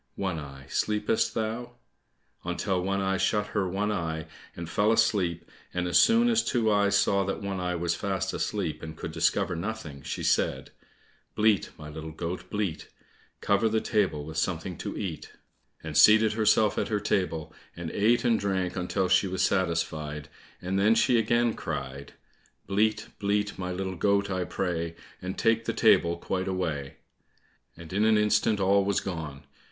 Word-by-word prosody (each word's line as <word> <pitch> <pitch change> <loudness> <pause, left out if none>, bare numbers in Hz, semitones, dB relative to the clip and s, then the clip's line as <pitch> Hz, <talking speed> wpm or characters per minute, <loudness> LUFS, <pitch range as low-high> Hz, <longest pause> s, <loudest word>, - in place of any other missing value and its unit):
One 95 -5 -2
eye, 70 -2 -10
sleepest 105 +1 0
thou?" 115 +2 -3 0.7
until 90 +1 -1
One 100 +1 -1
eye 95 0 0
shut 105 +2 +1
her 100 -3 -1
one 100 +3 -1
eye, 80 -5 -3 0.3
and 85 -1 -6
fell 105 +5 +2
asleep, 100 -7 +1 0.3
and 90 0 0
as 85 0 +4
soon 230 - +5
as 230 -1 +3
Two 115 -3 +1
eyes 100 -1 +3
saw 100 0 +2
that 95 +1 -3
One 100 -1 -3
eye 90 0 -1
was 85 0 0
fast 95 -1 -2
asleep, 85 -8 -2
and 80 0 -8
could - - -5
discover 90 - +1
nothing, 85 -6 -5
she - - -5
said, - - 0 0.6
"Bleat, 105 -4 +3
my 75 - -9
little 80 +1 -7
goat, 85 +3 -5
bleat, 105 -6 -3 0.5
Cover 100 +2 +2
the 110 +1 +1
table 95 -11 0
with 80 +1 -7
something 85 +1 -2
to - - -5
eat," 80 -7 -5 0.5
and - - -6
seated 110 0 +6
herself 110 -1 +3
at - - -1
her 105 -2 0
table, 80 -6 -1 0.2
and 85 -2 -5
ate 115 +4 +2
and 115 -2 +3
drank 95 -3 -1
until 90 0 -1
she 95 +2 +3
was 95 0 -1
satisfied, 80 -4 -1 0.3
and 95 +2 0
then 105 +3 +4
she 120 0 +4
again 120 +1 +2
cried, 70 +1 -6 0.5
"Bleat, 105 +2 0
bleat, 105 -1 -1
my 90 -1 -3
little 95 +1 -3
goat, 100 +2 +1
I 95 -1 -1
pray, 85 -3 -2 0.3
And 95 +1 -5
take 115 0 +2
the - - -1
table 85 0 +4
quite 95 +2 -3
away," 80 -7 -3 0.8
and 85 +1 -10
in 100 +2 +2
an 110 0 +4
instant 105 0 +2
all 100 +1 +3
was 100 0 +1
gone. 75 -6 -6
95 Hz, 170 wpm, -27 LUFS, 85-105 Hz, 0.8 s, seated